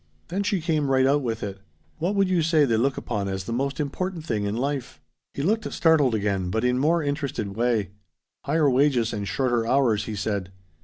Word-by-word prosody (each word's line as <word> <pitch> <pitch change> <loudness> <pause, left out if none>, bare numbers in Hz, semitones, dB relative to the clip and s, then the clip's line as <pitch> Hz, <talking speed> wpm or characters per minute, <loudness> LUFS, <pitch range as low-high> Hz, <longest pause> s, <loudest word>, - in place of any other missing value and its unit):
Then 190 +4 -1
she 200 -3 0
came 155 -4 0
right 130 -1 +4
out 145 +2 +3
with 115 -3 -3
it. 95 -1 -5 0.4
"What 180 +6 0
would 195 -1 +3
you 185 -2 +2
say 155 -2 +3
they 115 -4 +1
look 130 +4 +1
upon 105 -4 -3
as 95 -1 -3
the 115 - -4
most 140 +4 -2
important 165 +3 -3
thing 105 -9 -1
in 100 +1 -2
life?" 140 0 -3 0.4
He 140 - -2
looked 220 +7 0
startled 150 -8 +3
again, 100 -3 -1
but 110 +5 -1
in 125 0 +2
more 160 +4 +2
interested 140 -8 -3
way. 115 -4 0 0.5
"Higher 150 +2 +2
wages 130 -3 +2
and 100 -2 -3
shorter 120 +4 0
hours," 120 -5 +2
he 110 - -4
said. 100 -2 -2
130 Hz, 205 wpm, -25 LUFS, 110-155 Hz, 0.5 s, right